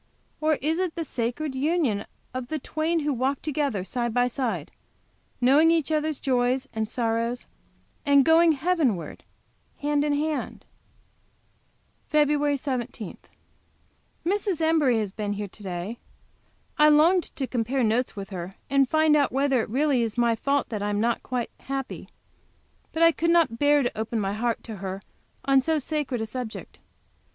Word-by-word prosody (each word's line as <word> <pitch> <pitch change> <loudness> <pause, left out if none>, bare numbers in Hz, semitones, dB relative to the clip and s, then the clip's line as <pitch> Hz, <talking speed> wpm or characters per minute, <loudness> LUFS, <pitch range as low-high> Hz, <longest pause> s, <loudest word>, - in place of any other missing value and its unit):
or 310 0 +2
is 320 +3 +1
it 365 -3 -1
the 335 - -2
sacred 265 +2 -3
union 270 -7 0 0.3
of 255 -1 -4
the 310 - -2
twain 315 +3 -1
who 295 -1 0
'walk 265 +2 0
together 285 -10 -1
side 240 +4 -2
by 245 +2 +2
side, 225 - -3 0.7
knowing 280 +6 +5
each 325 -2 +2
other's 310 -1 0
joys 255 0 +1
and 220 -1 -2
sorrows, 230 +1 -1 0.6
and 280 -2 +5
going 325 0 +6
Heavenward 290 - -1 0.6
hand 290 0 +1
in 295 -1 +1
hand? 300 +1 -2 1.4
FEB. 295 -1 +2
17. 245 - -4 1.1
Mrs. 390 -1 0
Embury 315 -7 +3
has 210 -3 -2
been 205 -1 -2
here 205 0 -4
to 205 - -16
day. 190 +4 -5 0.8
I 300 0 +7
longed 330 +4 +5
to 270 - -2
compare 250 +1 -1
notes 230 +3 +1
with 200 0 -7
her, 180 +1 -6 0.2
and 275 -2 +3
find 315 -1 +4
out 285 -2 +3
whether 270 -2 +2
it - - -5
really 270 +1 +2
is 230 0 -2
my 235 -1 +3
fault 280 +5 0
that 215 -3 -3
I 205 - -1
am 205 0 0
not 235 +2 +1
quite 250 -2 -3
happy. 270 -1 -5 0.8
But 325 - +1
I 330 - +7
could 335 +1 -1
not 330 -9 +3
bear 290 0 +4
to 245 - -2
open 220 +1 -2
my 195 -1 -1
heart 230 +2 -1
to 220 -3 -7
her 190 0 -5 0.4
on 270 -1 +5
so 320 +4 +1
sacred 290 -4 -2
a - - -1
subject. 225 0 -7
265 Hz, 160 wpm, -26 LUFS, 230-305 Hz, 1.4 s, I